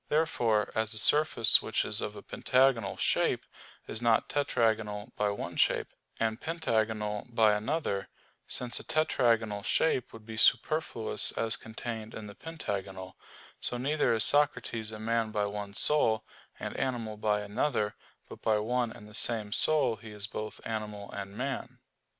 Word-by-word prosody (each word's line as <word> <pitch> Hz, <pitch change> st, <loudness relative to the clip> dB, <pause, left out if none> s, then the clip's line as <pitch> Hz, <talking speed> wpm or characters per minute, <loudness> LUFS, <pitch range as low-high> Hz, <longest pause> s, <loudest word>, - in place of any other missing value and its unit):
Therefore, 120 Hz, -9 st, +1 dB
as 110 Hz, 0 st, 0 dB
a -, -, -4 dB
surface 135 Hz, -2 st, +7 dB
which -, -, -1 dB
is -, -, +3 dB
of -, -, -4 dB
a -, -, -10 dB
pentagonal 125 Hz, -6 st, +1 dB
shape, -, -, +1 dB, 0.4 s
is 110 Hz, -, -4 dB
not 115 Hz, -2 st, +2 dB
tetragonal 110 Hz, -5 st, 0 dB
by 105 Hz, -, 0 dB
one 100 Hz, -, -5 dB
shape, -, -, +1 dB, 0.3 s
and 110 Hz, +1 st, -1 dB
pentagonal 110 Hz, -9 st, -1 dB
by 110 Hz, -3 st, +4 dB
another 105 Hz, -2 st, -2 dB, 0.4 s
since 125 Hz, -1 st, +1 dB
a -, -, -10 dB
tetragonal 115 Hz, -9 st, +1 dB
shape 130 Hz, -6 st, +1 dB
would 110 Hz, -1 st, -13 dB
be 110 Hz, 0 st, -8 dB
superfluous 115 Hz, -3 st, +2 dB
as 115 Hz, -1 st, -1 dB
contained 110 Hz, 0 st, -7 dB
in 110 Hz, -, -7 dB
the 105 Hz, -, -9 dB
pentagonal 100 Hz, -, -6 dB, 0.4 s
so 125 Hz, -, +1 dB
neither 145 Hz, +5 st, +1 dB
is 110 Hz, -, +5 dB
Socrates 125 Hz, -5 st, +1 dB
a 110 Hz, -, -7 dB
man 115 Hz, +1 st, -1 dB
by 105 Hz, -1 st, -1 dB
one 100 Hz, 0 st, -6 dB
soul, 110 Hz, -7 st, +2 dB, 0.3 s
and -, -, -5 dB
animal 115 Hz, -4 st, -2 dB
by 105 Hz, -1 st, 0 dB
another; 105 Hz, +1 st, -1 dB, 0.3 s
but -, -, -12 dB
by 110 Hz, -1 st, +2 dB
one 120 Hz, +2 st, -1 dB
and 105 Hz, -3 st, -12 dB
the 105 Hz, -, -15 dB
same 110 Hz, -2 st, -1 dB
soul 135 Hz, -3 st, +2 dB
he 110 Hz, +2 st, -12 dB
is 105 Hz, -1 st, -4 dB
both 110 Hz, +1 st, -6 dB
animal 105 Hz, -2 st, -5 dB
and 100 Hz, 0 st, -7 dB
man. 135 Hz, +2 st, -4 dB
110 Hz, 155 wpm, -30 LUFS, 105-125 Hz, 0.4 s, surface